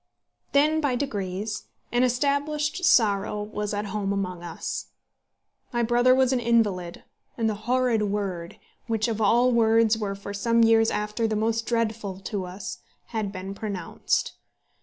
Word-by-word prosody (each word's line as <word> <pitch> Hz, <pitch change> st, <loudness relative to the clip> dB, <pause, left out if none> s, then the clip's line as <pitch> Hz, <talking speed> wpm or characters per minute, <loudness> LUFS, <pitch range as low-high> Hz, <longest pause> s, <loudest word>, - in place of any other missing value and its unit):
Then, 305 Hz, +3 st, +4 dB
by 280 Hz, -4 st, +1 dB
degrees, 210 Hz, -5 st, -3 dB, 0.3 s
an 240 Hz, -, +2 dB
established 290 Hz, +6 st, 0 dB
sorrow 210 Hz, -5 st, +3 dB
was 210 Hz, 0 st, -4 dB
at 205 Hz, 0 st, -2 dB
home 200 Hz, -2 st, -1 dB
among 185 Hz, -3 st, -2 dB
us. 170 Hz, -2 st, -5 dB, 0.8 s
My 240 Hz, -1 st, 0 dB
brother 245 Hz, +2 st, +4 dB
was 260 Hz, 0 st, +3 dB
an 255 Hz, -, +2 dB
invalid, 210 Hz, -7 st, 0 dB, 0.3 s
and 230 Hz, -2 st, +1 dB
the 220 Hz, -, +1 dB, 0.2 s
horrid 250 Hz, -3 st, +2 dB
word, 190 Hz, -5 st, -3 dB, 0.3 s
which 225 Hz, -1 st, 0 dB
of 225 Hz, -1 st, -2 dB
all 240 Hz, +4 st, +4 dB
words 225 Hz, -1 st, +4 dB
were 200 Hz, -2 st, -2 dB
for 200 Hz, 0 st, -7 dB
some 230 Hz, +3 st, +2 dB
years 225 Hz, 0 st, +5 dB
after 210 Hz, +2 st, -1 dB
the 220 Hz, -, -1 dB
most 225 Hz, +1 st, 0 dB
dreadful 220 Hz, -5 st, -1 dB
to 195 Hz, -1 st, -3 dB
us, 185 Hz, +2 st, -7 dB, 0.3 s
had 215 Hz, -4 st, -2 dB
been 190 Hz, 0 st, -6 dB
pronounced. 200 Hz, -4 st, -2 dB
220 Hz, 150 wpm, -26 LUFS, 200-240 Hz, 0.8 s, years